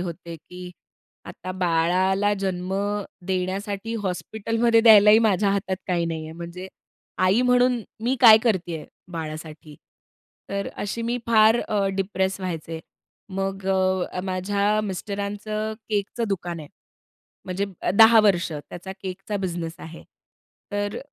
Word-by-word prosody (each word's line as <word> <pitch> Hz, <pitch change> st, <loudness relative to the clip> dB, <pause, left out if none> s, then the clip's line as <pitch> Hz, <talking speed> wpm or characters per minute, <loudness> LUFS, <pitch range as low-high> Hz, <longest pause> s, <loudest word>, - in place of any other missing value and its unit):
होते, 170 Hz, -1 st, -6 dB
की 180 Hz, +3 st, -11 dB, 0.5 s
आता 185 Hz, -, -7 dB
बाळाला 185 Hz, +3 st, +1 dB
जन्म 185 Hz, -1 st, -2 dB, 0.5 s
देण्यासाठी 195 Hz, +4 st, -2 dB
हॉस्पिटलमध्ये 225 Hz, +5 st, +1 dB
द्यायलाही 215 Hz, -1 st, +8 dB
माझ्या 205 Hz, -3 st, +2 dB
हातात 195 Hz, -1 st, -1 dB
काही 175 Hz, -2 st, 0 dB
नाहीये. 160 Hz, -1 st, -5 dB
म्हणजे 170 Hz, +3 st, -8 dB, 0.5 s
आई 195 Hz, +7 st, +4 dB
म्हणून 250 Hz, -1 st, +3 dB, 0.2 s
मी 260 Hz, +2 st, +1 dB
काय 220 Hz, -3 st, +10 dB
करतीये 175 Hz, -7 st, -1 dB, 0.3 s
बाळासाठी? 155 Hz, -1 st, -7 dB, 0.8 s
तर 200 Hz, 0 st, -2 dB
अशी 220 Hz, +3 st, -4 dB
मी 240 Hz, +2 st, -1 dB
फार 220 Hz, 0 st, +5 dB
अ, 205 Hz, -2 st, +1 dB
डिप्रेस 190 Hz, 0 st, -1 dB
व्हायचे. 165 Hz, -3 st, -5 dB, 0.5 s
मग 195 Hz, 0 st, -3 dB
अ, 185 Hz, -1 st, +1 dB
अ, 180 Hz, -, -3 dB
माझ्या 200 Hz, +3 st, 0 dB
मिस्टरांचं 205 Hz, +2 st, -4 dB, 0.2 s
केकचं 210 Hz, +3 st, -1 dB
दुकान 175 Hz, -4 st, -3 dB
आहे, 145 Hz, -, -10 dB, 0.8 s
म्हणजे 185 Hz, +2 st, -2 dB, 0.2 s
अ, -, -, +1 dB
10 225 Hz, +1 st, +8 dB
वर्ष 180 Hz, -5 st, +2 dB
त्याचा 175 Hz, +5 st, -8 dB
केकचा 195 Hz, +2 st, -4 dB
बिझनेस 170 Hz, -4 st, -4 dB
आहे. 165 Hz, -1 st, -10 dB, 0.7 s
तर 205 Hz, 0 st, -2 dB
190 Hz, 120 wpm, -24 LUFS, 180-210 Hz, 0.8 s, काय